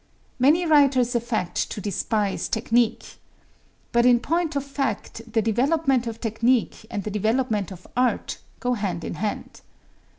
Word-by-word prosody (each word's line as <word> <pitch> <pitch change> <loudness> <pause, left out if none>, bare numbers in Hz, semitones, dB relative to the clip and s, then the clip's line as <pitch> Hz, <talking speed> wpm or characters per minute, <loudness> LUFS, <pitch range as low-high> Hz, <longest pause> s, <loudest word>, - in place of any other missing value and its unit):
Many 305 +8 +4
writers 275 -6 +4
affect 235 -6 -1
to - - -5
despise 205 +1 -1
technique. 230 0 0 0.7
But 235 0 +3
in 245 -1 +5
point 330 +4 -1
of 280 0 -1
fact 275 -4 -3
the 225 -2 +1
development 265 +3 +1
of 230 -1 -5
technique 230 0 0
and 205 - -4
the 210 - -4
development 215 -1 0
of 185 -1 -11
art 250 0 0 0.2
go 250 -1 0
hand 195 -7 -3
in - - -4
hand. 205 +6 -4
235 Hz, 140 wpm, -24 LUFS, 215-265 Hz, 0.7 s, in